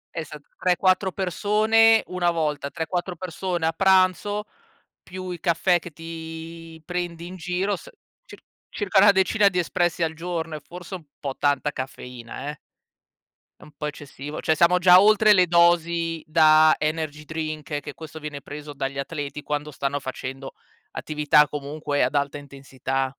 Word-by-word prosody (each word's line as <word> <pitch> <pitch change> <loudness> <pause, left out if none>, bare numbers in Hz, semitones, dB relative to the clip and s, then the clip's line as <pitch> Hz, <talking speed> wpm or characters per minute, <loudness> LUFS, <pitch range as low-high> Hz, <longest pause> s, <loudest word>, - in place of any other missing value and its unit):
Esa 155 -2 -6 0.2
3-4 185 +1 +2
persone, 215 +5 +3
1 180 -1 0
volta, 150 -4 -1
3-4 175 +3 -3
persone 175 0 -3
a 160 - +2
pranzo, 190 +3 +2 0.6
più 185 0 -7
i 175 - -6
caffè 175 +2 +2
che 175 - -10
ti 165 0 -9
prendi 175 -1 -4
in 180 +2 -8
giro, 180 +3 -1
s - - -12 0.4
cir - - -13 0.3
circa 200 -2 +1
una 205 0 +8
decina 200 +2 +3
di 180 - -4
espressi 175 0 0
al 160 - -1
giorno; 165 -1 -4
è - - -6
forse 175 +5 -11
un 170 - -10
po' 135 -2 -4
tanta 145 +1 +1
caffeina, 125 0 -7
eh. 150 - -12 1.0
È - - -23
un - - -15
po' 150 - -4
eccessivo, 145 0 -7
cioè, 160 - +2
siamo 175 +2 +4
già 180 0 +8
oltre 215 +1 +5
le 185 -3 +6
dosi 170 -1 +2
da 155 -1 +6
energy 155 -1 -2
drink, 155 -1 -4
che - - -8
questo 160 -1 -10
viene 150 -2 -7
preso 145 +1 -9
dagli 135 0 -4
atleti, 145 0 -5
quando 150 0 -3
stanno 140 0 -2
facendo 135 0 -7 0.4
attività, 150 -1 +2
comunque, 145 0 -2
ad - - -1
alta 140 0 0
intensità. 135 -1 -4
160 Hz, 155 wpm, -24 LUFS, 150-180 Hz, 1.0 s, una